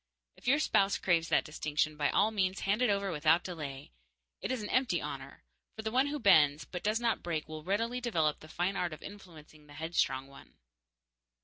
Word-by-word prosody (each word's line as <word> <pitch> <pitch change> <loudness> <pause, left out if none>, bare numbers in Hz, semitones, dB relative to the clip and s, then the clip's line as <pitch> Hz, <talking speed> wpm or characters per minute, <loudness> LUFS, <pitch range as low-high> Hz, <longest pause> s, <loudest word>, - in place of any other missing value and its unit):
If - - -14
your 275 +4 +5
spouse 200 -9 +2
craves 170 -2 +1
that - - +3
distinction, 155 0 -1
by 145 -1 +1
all 215 - +3
means 190 -3 0
hand 205 +4 0
it 250 - +3
over 200 -1 0
without 160 +2 +3
delay. 145 -6 -7 0.5
It - - -2
is 255 -4 -2
an 205 - -5
empty 255 -1 +2
honor, - - -7 0.3
for 220 - -7
the 220 - -2
one 260 +4 +3
who 295 +1 -2
bends 155 - +4
but 180 - -6
does 215 +2 +1
not 235 -1 0
break 165 -3 -3
will 155 -1 -7
readily 230 +7 -1
develop 165 -11 0
the 155 - -13
fine 175 +5 -1
art 175 -4 -1
of 155 - -10
influencing 160 -6 -12
the 145 - -14
headstrong 150 -4 0
one. 140 0 -16
175 Hz, 205 wpm, -32 LUFS, 155-215 Hz, 0.5 s, your